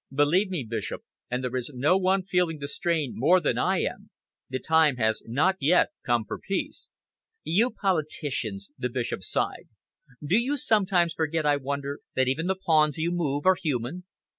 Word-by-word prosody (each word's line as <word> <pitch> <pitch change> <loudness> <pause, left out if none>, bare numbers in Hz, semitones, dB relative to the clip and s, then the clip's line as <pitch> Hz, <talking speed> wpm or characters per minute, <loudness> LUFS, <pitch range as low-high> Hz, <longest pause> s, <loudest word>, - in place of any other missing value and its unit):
Believe 150 +8 +2
me, 170 -9 -3
Bishop 110 -2 -4 0.3
and 125 +1 -2
there 125 0 -3
is 125 +1 -2
no 145 +8 +3
one 190 0 +2
feeling 180 -3 0
the 140 -1 -5
strain 160 -4 -1
more 170 +9 +4
than 165 - 0
I - - +2
am - - -4 0.4
the 130 - -2
time 160 0 +3
has 110 -2 0
not 155 +11 +2
yet 160 +6 +4
come 120 -2 +1
for - - -6
peace." 195 - -4 0.5
"You 215 +9 +2
politicians!" 145 - -2
the 125 -1 -1
Bishop 120 -5 -3
sighed. 90 - -2 0.6
"Do 185 +9 +3
you 270 +5 -1
sometimes 190 - +2
forget, 160 -1 -1
I 145 -1 +3
wonder, 140 +1 -4 0.2
that 130 0 +2
even 155 +7 0
the 190 - +1
pawns 155 -5 +2
you 165 +2 0
move 145 -5 -1
are 185 - +7
human?" 145 +4 -3
155 Hz, 175 wpm, -26 LUFS, 130-180 Hz, 0.6 s, are